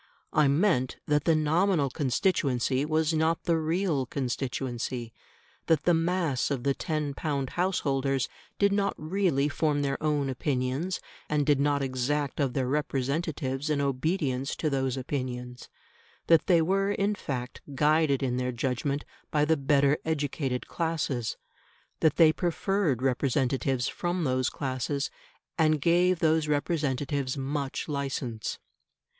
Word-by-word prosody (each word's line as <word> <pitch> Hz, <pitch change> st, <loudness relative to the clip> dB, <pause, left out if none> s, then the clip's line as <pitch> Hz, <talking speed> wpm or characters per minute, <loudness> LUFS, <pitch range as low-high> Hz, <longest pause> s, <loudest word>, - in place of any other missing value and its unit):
I 150 Hz, -2 st, +4 dB
meant 140 Hz, -3 st, +2 dB
that 150 Hz, -1 st, +1 dB
the 165 Hz, -, +4 dB
nominal 155 Hz, -1 st, +2 dB
constituency 135 Hz, -2 st, +1 dB
was 155 Hz, +1 st, +1 dB
not 160 Hz, +1 st, +1 dB
the 165 Hz, -1 st, +2 dB
real 160 Hz, -4 st, 0 dB
constituency; 125 Hz, -2 st, -3 dB, 0.5 s
that 160 Hz, -3 st, +3 dB
the 175 Hz, -, +4 dB
mass 165 Hz, -5 st, +1 dB
of 135 Hz, -4 st, -2 dB
the 140 Hz, 0 st, +2 dB
"ten 150 Hz, -2 st, -2 dB
pound" 140 Hz, -3 st, -2 dB
house 180 Hz, +1 st, 0 dB
holders 135 Hz, -2 st, 0 dB, 0.3 s
did 200 Hz, 0 st, +3 dB
not 200 Hz, 0 st, +1 dB
really 155 Hz, -4 st, +1 dB
form 150 Hz, -1 st, 0 dB
their 135 Hz, -1 st, -1 dB
own 150 Hz, -2 st, +1 dB
opinions, 135 Hz, +6 st, -1 dB, 0.3 s
and 150 Hz, -1 st, +1 dB
did 145 Hz, -2 st, +3 dB
not 140 Hz, 0 st, +2 dB
exact 135 Hz, +3 st, -1 dB
of 135 Hz, -4 st, +1 dB
their 130 Hz, -1 st, 0 dB
representatives 140 Hz, 0 st, -1 dB
an 150 Hz, -2 st, +1 dB
obedience 140 Hz, -1 st, -1 dB
to 155 Hz, -, -1 dB
those 135 Hz, -1 st, 0 dB
opinions; 125 Hz, -2 st, -4 dB, 0.6 s
that 165 Hz, -2 st, +4 dB
they 170 Hz, -3 st, +5 dB
were 195 Hz, +3 st, +1 dB
in 205 Hz, +1 st, +1 dB
fact 125 Hz, -10 st, -5 dB
guided 150 Hz, -1 st, +3 dB
in 125 Hz, -2 st, 0 dB
their 125 Hz, 0 st, -1 dB
judgment 130 Hz, +4 st, -2 dB, 0.2 s
by 150 Hz, -1 st, +2 dB
the 160 Hz, +1 st, +3 dB
better 140 Hz, 0 st, +3 dB
educated 145 Hz, -4 st, -2 dB
classes; 155 Hz, -8 st, -2 dB, 0.6 s
that 160 Hz, -3 st, +3 dB
they 160 Hz, -2 st, +6 dB
preferred 175 Hz, -, 0 dB
representatives 130 Hz, -1 st, +1 dB
from 175 Hz, 0 st, -2 dB
those 130 Hz, -2 st, +1 dB
classes, 140 Hz, +1 st, -2 dB, 0.5 s
and 155 Hz, -1 st, +4 dB
gave 175 Hz, +4 st, +3 dB
those 160 Hz, -1 st, +2 dB
representatives 145 Hz, -3 st, -1 dB
much 140 Hz, 0 st, -3 dB
licence. 135 Hz, -6 st, -3 dB
145 Hz, 135 wpm, -28 LUFS, 130-160 Hz, 0.6 s, they